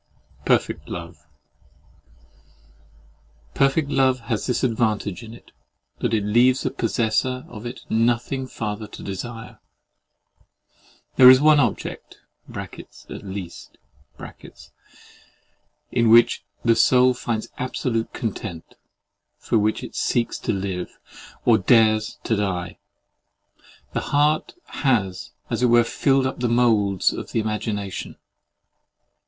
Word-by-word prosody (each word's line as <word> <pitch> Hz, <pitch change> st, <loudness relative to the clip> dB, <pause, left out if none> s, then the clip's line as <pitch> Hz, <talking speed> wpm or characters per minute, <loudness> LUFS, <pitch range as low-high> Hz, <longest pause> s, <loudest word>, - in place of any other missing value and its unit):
PERFECT -, -, 0 dB
LOVE 85 Hz, -3 st, -8 dB, 2.3 s
Perfect 140 Hz, -, +1 dB
love 130 Hz, -2 st, +2 dB
has 115 Hz, -2 st, -3 dB
this 125 Hz, 0 st, -1 dB
advantage 110 Hz, -6 st, 0 dB
in 110 Hz, -, -10 dB
it, -, -, -18 dB, 0.5 s
that -, -, -1 dB
it 110 Hz, -2 st, +1 dB
leaves 120 Hz, +5 st, +3 dB
the -, -, -2 dB
possessor 120 Hz, +3 st, -1 dB
of 110 Hz, +2 st, -8 dB
it 120 Hz, -, -8 dB
nothing 120 Hz, +3 st, 0 dB
farther 105 Hz, -3 st, -5 dB
to -, -, -11 dB
desire. 115 Hz, +4 st, -7 dB, 1.6 s
There 125 Hz, -1 st, +10 dB
is 130 Hz, 0 st, +8 dB
one 150 Hz, +1 st, +5 dB
object 120 Hz, -7 st, -2 dB, 0.3 s
(at -, -, -9 dB
least) 95 Hz, -3 st, -8 dB, 2.1 s
in 115 Hz, -1 st, +2 dB
which 115 Hz, +1 st, +5 dB, 0.2 s
the 115 Hz, -1 st, +5 dB
soul 125 Hz, +1 st, +4 dB
finds 115 Hz, -3 st, -4 dB
absolute 125 Hz, -2 st, -2 dB
content, 100 Hz, -6 st, -6 dB, 0.6 s
for 115 Hz, -, 0 dB
which 105 Hz, +1 st, 0 dB
it -, -, -9 dB
seeks 120 Hz, -1 st, -1 dB
to -, -, -2 dB
live, 95 Hz, -3 st, -4 dB, 0.5 s
or 115 Hz, -2 st, +5 dB
dares 110 Hz, +1 st, +3 dB
to 110 Hz, -, 0 dB
die. 90 Hz, -4 st, -3 dB, 1.1 s
The -, -, 0 dB
heart 150 Hz, +2 st, +1 dB, 0.3 s
has 105 Hz, -10 st, 0 dB, 0.2 s
as -, -, -1 dB
it 125 Hz, -, +4 dB
were 120 Hz, 0 st, +5 dB
filled 135 Hz, +3 st, +1 dB
up 130 Hz, -, -3 dB
the 120 Hz, -1 st, 0 dB
moulds 110 Hz, -5 st, +2 dB
of -, -, -7 dB
the -, -, +1 dB
imagination. 105 Hz, -2 st, -4 dB
115 Hz, 115 wpm, -23 LUFS, 105-125 Hz, 2.3 s, There